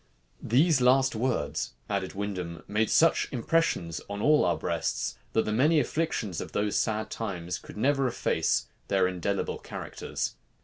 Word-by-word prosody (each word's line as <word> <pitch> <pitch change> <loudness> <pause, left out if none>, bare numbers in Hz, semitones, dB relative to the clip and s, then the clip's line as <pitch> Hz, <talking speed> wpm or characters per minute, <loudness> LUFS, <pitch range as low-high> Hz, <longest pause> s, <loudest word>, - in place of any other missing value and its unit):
"These 140 +4 +3
last 130 +2 +4
words," 115 - -1
added 100 -2 -2
Windham, 90 -5 -4
"made 110 +1 +1
such 165 0 +4
impressions 120 - 0
on 100 0 -4
all 150 +7 +4
our - - +2
breasts, - - -2 0.2
that 110 - +2
the 105 - -1
many 150 +8 +4
afflictions 135 - -1
of - - -8
these 105 0 0
sad 110 -1 0
times 90 -6 -4
could - - -12
never 135 +3 +2
efface 115 - +1 0.2
their 95 -2 +3
indelible 95 +2 -2
characters." - - -5
110 Hz, 145 wpm, -28 LUFS, 95-135 Hz, 0.2 s, last